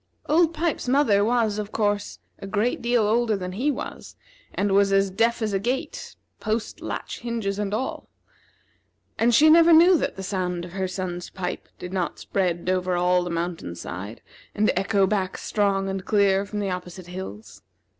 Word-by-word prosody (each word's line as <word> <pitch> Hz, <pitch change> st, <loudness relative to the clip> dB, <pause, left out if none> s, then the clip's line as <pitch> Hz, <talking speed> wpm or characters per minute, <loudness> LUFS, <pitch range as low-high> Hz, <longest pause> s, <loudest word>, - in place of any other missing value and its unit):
Old 325 Hz, +2 st, +3 dB
Pipes's 325 Hz, -5 st, -2 dB
mother 250 Hz, -7 st, +4 dB
was, 220 Hz, -2 st, +1 dB
of 210 Hz, 0 st, -5 dB
course, 205 Hz, -1 st, -1 dB, 0.2 s
a 195 Hz, -, -7 dB
great 215 Hz, +5 st, 0 dB
deal 240 Hz, -1 st, +2 dB
older 220 Hz, 0 st, +2 dB
then 180 Hz, -1 st, -5 dB
he 245 Hz, +10 st, 0 dB
was, 290 Hz, -, -5 dB, 0.4 s
and 200 Hz, 0 st, -1 dB
was 200 Hz, 0 st, +4 dB
as 195 Hz, 0 st, +3 dB
deaf 230 Hz, +4 st, +1 dB
as 215 Hz, -2 st, -1 dB
a 195 Hz, -, +1 dB
gate, 260 Hz, -, -3 dB, 0.2 s
posts, 220 Hz, +1 st, -3 dB
latch, -, -, -5 dB
hinges, 225 Hz, -4 st, -3 dB
and 205 Hz, -1 st, -2 dB
all, 230 Hz, +5 st, -3 dB, 1.1 s
and 235 Hz, +1 st, +4 dB
she 305 Hz, +7 st, +6 dB
never 335 Hz, +2 st, +7 dB
knew 340 Hz, +3 st, +7 dB
that -, -, -2 dB
the 190 Hz, -, -6 dB
sound 180 Hz, -3 st, -2 dB
of 175 Hz, -, -11 dB
her 190 Hz, +1 st, -2 dB
son's 180 Hz, -1 st, -5 dB
pipe 180 Hz, -2 st, -5 dB
did 180 Hz, +1 st, -8 dB
not 185 Hz, -3 st, -2 dB
spread 180 Hz, -3 st, -2 dB
over 185 Hz, -1 st, +1 dB
all 180 Hz, 0 st, +3 dB
the 175 Hz, -, -4 dB
mountainside, 110 Hz, -, -5 dB, 0.3 s
and 215 Hz, +1 st, +3 dB
echo 195 Hz, +1 st, +2 dB
back 190 Hz, -1 st, -1 dB
strong 200 Hz, -2 st, 0 dB
and 190 Hz, -1 st, -3 dB
clear 200 Hz, -1 st, +2 dB
from 210 Hz, -, -6 dB
the 195 Hz, -2 st, -1 dB
opposite 180 Hz, 0 st, -6 dB
hills. 110 Hz, -, -8 dB
200 Hz, 175 wpm, -24 LUFS, 185-225 Hz, 1.1 s, never